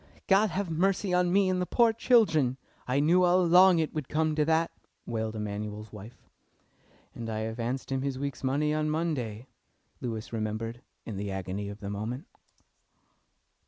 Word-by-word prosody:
"God 205 Hz, +2 st, +4 dB
have 190 Hz, 0 st, -3 dB
mercy 190 Hz, +3 st, +1 dB
on 180 Hz, 0 st, +3 dB
me 195 Hz, +1 st, +4 dB
and 185 Hz, -1 st, +1 dB
the 180 Hz, -, -2 dB
poor 235 Hz, -2 st, +4 dB
children! 165 Hz, -, +3 dB, 0.3 s
I 130 Hz, +2 st, +1 dB
knew 165 Hz, +5 st, +4 dB
all 180 Hz, +1 st, +4 dB
along 180 Hz, +1 st, +6 dB
it 160 Hz, -2 st, -1 dB
would 150 Hz, -4 st, -4 dB
come 155 Hz, 0 st, +1 dB
to 150 Hz, 0 st, +2 dB
that!" 160 Hz, +1 st, +2 dB, 0.3 s
wailed 110 Hz, -1 st, -3 dB
Emanuel's 105 Hz, 0 st, -5 dB
wife. 105 Hz, +3 st, -12 dB, 0.9 s
"And 115 Hz, -1 st, -6 dB
I 110 Hz, -1 st, -2 dB
advanced 115 Hz, +4 st, -3 dB
him 135 Hz, -1 st, 0 dB
his 135 Hz, -1 st, -2 dB
week's 140 Hz, -1 st, -4 dB
money 145 Hz, +3 st, +1 dB
on 155 Hz, 0 st, 0 dB
Monday," 135 Hz, -9 st, -2 dB, 0.6 s
Lewis 115 Hz, -2 st, -5 dB
remembered 115 Hz, +2 st, -3 dB, 0.2 s
in 110 Hz, -4 st, -6 dB
the 100 Hz, +1 st, -3 dB
agony 95 Hz, +1 st, -4 dB
of 100 Hz, +1 st, -9 dB
the 100 Hz, -, -5 dB
moment. 115 Hz, -, -4 dB
135 Hz, 165 wpm, -29 LUFS, 110-170 Hz, 0.9 s, along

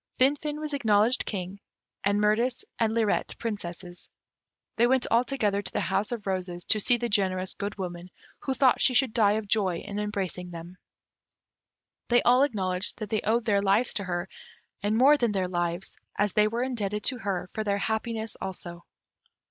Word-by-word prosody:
Finfin 295 Hz, +3 st, +1 dB
was 305 Hz, -1 st, -4 dB
acknowledged 225 Hz, -2 st, +2 dB
King, 190 Hz, -1 st, -4 dB, 0.4 s
and 200 Hz, +1 st, +2 dB
Mirtis 230 Hz, +4 st, +1 dB, 0.2 s
and 225 Hz, -2 st, +2 dB
Lirette 225 Hz, -2 st, 0 dB
Princesses. 180 Hz, -5 st, -6 dB, 0.7 s
They 235 Hz, +2 st, +4 dB
went 260 Hz, 0 st, +2 dB
all 235 Hz, +2 st, +5 dB
together 210 Hz, -6 st, 0 dB
to 185 Hz, -, -6 dB
the -, -, -1 dB
House 205 Hz, +4 st, -1 dB
of 230 Hz, -4 st, -4 dB
Roses, 180 Hz, -2 st, -3 dB
to 215 Hz, -, +3 dB
see 240 Hz, +4 st, +3 dB
the 240 Hz, 0 st, -2 dB
generous 190 Hz, -3 st, 0 dB
Good 205 Hz, +1 st, -5 dB
Woman, 180 Hz, -2 st, -6 dB, 0.3 s
who 265 Hz, -, -2 dB
thought 260 Hz, -2 st, +4 dB
she 255 Hz, -, +4 dB
should 255 Hz, -3 st, +3 dB
die 210 Hz, -4 st, +4 dB
of 215 Hz, -1 st, -2 dB
joy 195 Hz, -5 st, +1 dB
in 205 Hz, +2 st, -6 dB
embracing 195 Hz, -4 st, -3 dB
them. 170 Hz, +1 st, -10 dB, 1.3 s
They 240 Hz, 0 st, +4 dB
all 250 Hz, +2 st, +5 dB
acknowledged 190 Hz, -8 st, +1 dB
that 215 Hz, -3 st, -6 dB
they 215 Hz, -, +1 dB
owed 225 Hz, +2 st, +1 dB
their 200 Hz, -3 st, +2 dB
lives 205 Hz, +5 st, +2 dB
to 200 Hz, -, -2 dB
her, 175 Hz, 0 st, -2 dB, 0.5 s
and 210 Hz, +2 st, +1 dB
more 280 Hz, +5 st, +6 dB
than 235 Hz, -6 st, +1 dB
their 190 Hz, -2 st, 0 dB
lives, 175 Hz, 0 st, -3 dB, 0.2 s
as 205 Hz, -1 st, +1 dB
they 210 Hz, 0 st, +4 dB
were 230 Hz, +3 st, -1 dB
indebted 210 Hz, -5 st, -2 dB
to 255 Hz, -3 st, 0 dB
her 195 Hz, -4 st, -2 dB
for 220 Hz, -, -2 dB
their 200 Hz, -1 st, 0 dB
happiness 220 Hz, +1 st, -2 dB
also. 175 Hz, -2 st, -7 dB
210 Hz, 180 wpm, -27 LUFS, 190-235 Hz, 1.3 s, more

